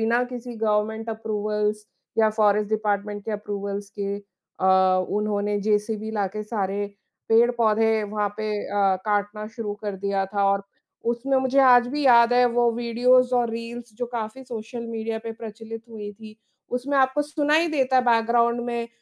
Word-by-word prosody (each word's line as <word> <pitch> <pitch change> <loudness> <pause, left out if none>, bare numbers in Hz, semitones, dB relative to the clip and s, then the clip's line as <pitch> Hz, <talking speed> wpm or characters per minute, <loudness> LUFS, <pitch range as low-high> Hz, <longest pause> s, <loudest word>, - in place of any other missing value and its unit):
बिना 230 +2 +2
किसी 245 -1 -7
government 220 +1 0
approvals 210 -1 -2 0.3
या 220 -1 +5
फ़ॉरेस्ट 210 -1 +2
डिपार्टमेंट 205 -1 -1
के 225 - -4
अप्रूवल्स 200 -1 -4
के 200 0 -2 0.4
अ, 185 -1 +4
उन्होंने 205 0 -1
जेसीबी 215 +1 -1
लाके 210 0 -2
सारे 205 -2 -2 0.4
पेड़-पौधे 225 -1 +3
वहाँ 210 0 -1
पे 215 0 -3 0.2
अ, 195 -2 +2
काटना 210 0 -1
शुरू 210 -3 -3
कर 200 -2 -3
दिया 195 0 -1
था 200 0 -1
और 200 0 0 0.5
उसमें 265 +3 0
मुझे 260 +1 +1
आज 245 -2 +6
भी 290 +2 -2
याद 235 -1 +6
है 250 0 +5
वो 240 0 +3
वीडियोज़ 250 +2 +3
और 240 -1 +2
रील्स 230 0 -7
जो 245 - -3
काफ़ी 230 +3 -4
सोशल 235 0 -6
मीडिया 225 0 -3
पे 225 - -4
प्रचलित 225 0 -8
हुई 210 -2 -7
थी। 215 +1 -13 0.4
उसमें 275 +3 -2
आपको 265 +2 +3
सुनाई 300 +2 +1
देता 265 -4 +1
है 255 - +5
बैकग्राउंड 235 0 +3
में 235 -1 -3
220 Hz, 160 wpm, -24 LUFS, 210-240 Hz, 0.5 s, आज